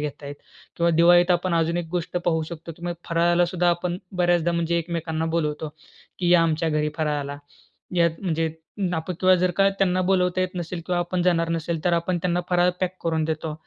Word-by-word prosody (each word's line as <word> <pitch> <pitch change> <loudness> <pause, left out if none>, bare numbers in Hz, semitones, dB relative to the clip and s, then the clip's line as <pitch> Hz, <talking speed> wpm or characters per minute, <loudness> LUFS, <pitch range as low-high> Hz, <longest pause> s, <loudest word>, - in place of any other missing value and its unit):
घेत 150 0 -5
आहेत." 145 0 -6 0.4
किंवा 170 0 +2
दिवाळीत 175 +2 +5
आपण 175 0 +1
अजून 165 +1 +1
एक 175 -1 -2
गोष्ट 180 0 -3
पाहू 160 -2 +1
शकतो. 165 +1 -8
तुम्ही 175 0 -4
फराळाला 170 +1 +3
सुद्धा 175 -1 +2
आपण 175 +1 -2 0.2
बऱ्याचदा 175 -1 +2
म्हणजे 170 0 0
एकमेकांना 165 -1 -3
बोलवतो 150 -1 -1 0.5
की 175 -2 0
या 175 -1 +6
आमच्या 160 0 +1
घरी 150 0 0
फराळाला. 145 -2 -2 0.6
यात 170 -1 +4
म्हणजे 165 -4 0 0.5
आपण 165 +2 -3
किंवा 185 0 +6
जर 180 +1 +1
का 195 0 +5
त्यांना 185 -1 +2
बोलवता 180 -1 +2
येत 185 0 -2
नसेल 175 0 -4
किंवा 180 -1 0
आपण 175 +1 -1
जाणार 165 -2 +2
नसेल 165 0 -2
तर 175 - +2
आपण 170 +1 0
त्यांना 175 -1 +1
फराळ 180 0 +4
पॅक 185 0 -1
करून 160 -1 +1
देतो. 155 0 -3
170 Hz, 195 wpm, -24 LUFS, 160-180 Hz, 0.6 s, या